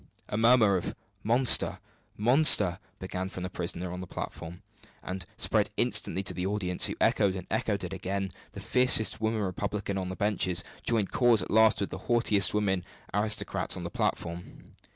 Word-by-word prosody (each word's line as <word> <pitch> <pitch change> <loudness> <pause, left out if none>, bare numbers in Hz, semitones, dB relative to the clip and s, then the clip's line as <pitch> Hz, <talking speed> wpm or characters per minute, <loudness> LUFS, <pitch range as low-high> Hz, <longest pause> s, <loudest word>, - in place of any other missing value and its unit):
A - - -3
murmur 110 -3 +4
of 90 - -5 0.3
"Monster! 120 +3 +4 0.4
monster!" 110 - +5 0.2
began 95 0 -5
with 95 - -9
the 90 0 -5
prisoners 85 +1 -3
on 90 +1 -6
the 95 - -8
platform, 85 +1 -8 0.4
and 90 -1 -6
spread - - 0
instantly 95 - +2
to - - -2
the 90 - -4
audience, 95 -2 +2
who - - -4
echoed 100 -2 +2
and 90 -2 -7
echoed 100 -3 -1
it 90 +1 -5
again; 95 0 -4 0.2
the - - -8
fiercest 125 -5 +2
woman 110 0 -1
republican 100 +1 -3
on 90 -1 -4
the 95 - -5
benches 95 -4 -1 0.2
joined 110 -4 -1
cause 120 -3 +3
at - - -8
last 110 -1 +4
with 100 - -3
the 95 - -6
haughtiest 110 -5 +2
woman 95 -4 -1 0.3
aristocrat 105 +2 +1
on - - -6
the - - -6
platform. 85 +1 -5
100 Hz, 175 wpm, -28 LUFS, 90-110 Hz, 0.4 s, monster